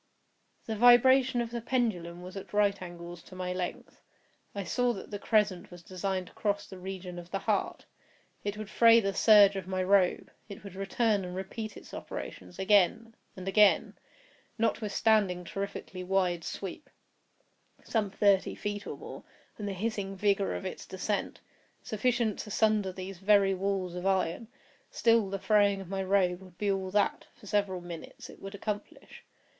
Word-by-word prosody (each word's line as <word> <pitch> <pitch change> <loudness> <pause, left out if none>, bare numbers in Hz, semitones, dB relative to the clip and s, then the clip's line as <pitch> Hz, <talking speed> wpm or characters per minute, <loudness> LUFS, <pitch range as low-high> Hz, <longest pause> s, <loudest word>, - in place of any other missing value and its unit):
The 220 - -3
vibration 245 +2 +6
of 230 -1 -4
the 235 -1 -4
pendulum 185 -9 -1
was 185 +1 -9
at 195 - -8
right 205 -1 +2
angles 175 -1 -8
to 185 - -14
my 180 0 -3
length. 180 -1 -5 0.5
I 200 - -3
saw 245 +5 +1
that 195 - -9
the 205 - -4
crescent 210 -5 +1
was 175 -1 -12
designed 185 +1 -3
to - - -16
cross 205 -1 -1
the 190 -2 -11
region 180 -1 -6
of 175 0 -11
the 195 - -2
heart. - - -1 0.6
It 205 0 -3
would 215 -1 -6
fray 230 +2 +6
the 195 -3 -1
serge 205 -1 +7
of 190 -2 -5
my 185 0 -1
robe—it 195 +1 0
would 200 -3 -9
return 200 +2 0
and 180 0 -6
repeat 210 +3 -6
its - - -13
operations—again—and 195 +1 -1
again. 205 +1 +4 0.6
Notwithstanding 215 -4 +1
its 175 - -11
terrifically 195 -2 -5
wide 180 -2 0
sweep 195 - -6 0.9
(some 215 -3 0
thirty 200 -1 +2
feet 205 0 -4
or - - -5
more) - - -9 0.4
and 205 - -4
the 200 - -2
hissing 200 -1 -3
vigor 200 0 +1
of - - -6
its 185 - -6
descent, 190 +2 -3 0.4
sufficient 225 0 0
to - - -6
sunder 215 -2 +2
these 185 0 -8
very 195 0 +4
walls 190 -1 -2
of 180 +2 -3
iron, 190 +2 0 0.4
still 230 -3 +3
the 195 - -2
fraying 205 -1 +3
of 190 -2 -9
my 195 0 -2
robe 185 -2 +2
would 185 -2 -15
be 205 -1 0
all 190 -1 -2
that, 205 +2 0
for - - -17
several 200 -3 0
minutes, 175 -2 -9
it - - -16
would 195 +1 -7
accomplish. 205 +1 -6
195 Hz, 165 wpm, -30 LUFS, 185-210 Hz, 0.9 s, serge